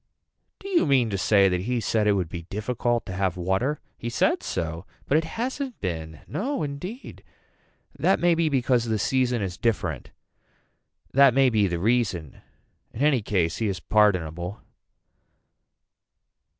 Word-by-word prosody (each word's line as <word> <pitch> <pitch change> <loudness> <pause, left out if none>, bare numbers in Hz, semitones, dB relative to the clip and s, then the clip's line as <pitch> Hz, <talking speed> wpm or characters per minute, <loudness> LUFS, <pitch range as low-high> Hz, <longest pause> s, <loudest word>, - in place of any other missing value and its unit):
Do 395 - -10
you 360 - +2
mean 130 -5 +3
to 100 - -1
say 100 0 +4
that 90 -1 0
he 120 +5 -1
said 110 -1 +1
it 105 - +5
would 95 -4 0
be 85 +1 -6
difficult 115 +6 -2
to - - -6
have 95 -1 -1
water. 95 +12 0 0.2
He 120 - -4
said 120 - +1
so. 85 +2 -4 0.2
But 140 - +1
it 160 - -4
hasn't 260 +2 -3
been 80 -4 -5
No 270 - -2
indeed. 165 - -7 0.8
That - - +3
may 175 0 +4
be 165 -1 +1
because 125 -3 +1
the 110 -1 0
season 125 +1 +1
is 90 -3 -4
different. 90 - -1 1.0
That 135 -2 +6
may 135 -2 +4
be 105 -3 +3
the 85 -1 -2
reason. 95 - -1 0.5
In 115 - -7
any 145 -5 +3
case 90 -5 0
he 110 - -1
is 95 -2 -2
pardonable. 90 -3 +1
110 Hz, 155 wpm, -25 LUFS, 90-135 Hz, 1.0 s, That